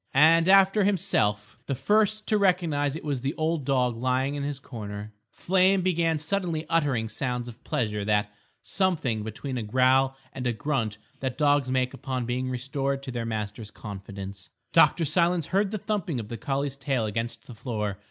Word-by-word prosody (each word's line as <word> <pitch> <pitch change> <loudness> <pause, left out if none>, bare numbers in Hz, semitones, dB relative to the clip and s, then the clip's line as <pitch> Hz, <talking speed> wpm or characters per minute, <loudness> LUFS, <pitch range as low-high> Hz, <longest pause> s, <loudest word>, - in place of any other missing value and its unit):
And, 165 +4 +6
after 195 +1 +6
himself, 110 - 0
the 140 - -1
first 215 - +2
to 215 -2 +2
recognise 165 -7 +2
it 160 - -6
was 140 -4 -2
the 135 +4 -2
old 160 -2 -1
dog 125 -3 +2
lying 130 +3 0
in 145 - -3
his 145 0 -2
corner. 105 -5 -7 0.2
Flame 190 +1 +2
began 170 -3 +2
suddenly 165 0 -2
uttering 140 -9 +1
sounds 125 +2 -2
of 120 0 -11
pleasure, 105 -3 -1
that 105 0 +1 0.3
"something" 160 - 0
between 120 +5 -4
a - - -2
growl 130 +4 +3 0.2
and 130 -2 -3
a 120 - +1
grunt 110 -3 -1 0.2
that 130 -2 -3
dogs 145 -3 +3
make 130 0 +1
upon 130 -2 -3
being 125 +2 -2
restored 135 +2 -2
to 135 - -5
their 120 -2 -3
master's 105 -1 -4
confidence. 100 -2 -8 0.2
Dr. 165 - +5
Silence 170 +1 +2
heard 195 +5 +1
the 215 - -3
thumping 185 - -2
of 105 -2 -7
the 115 - -5
collie's 140 +1 -2
tail 135 -4 0
against 115 +2 -3
the 125 - -10
floor. 110 -4 -3
135 Hz, 175 wpm, -27 LUFS, 115-160 Hz, 0.3 s, And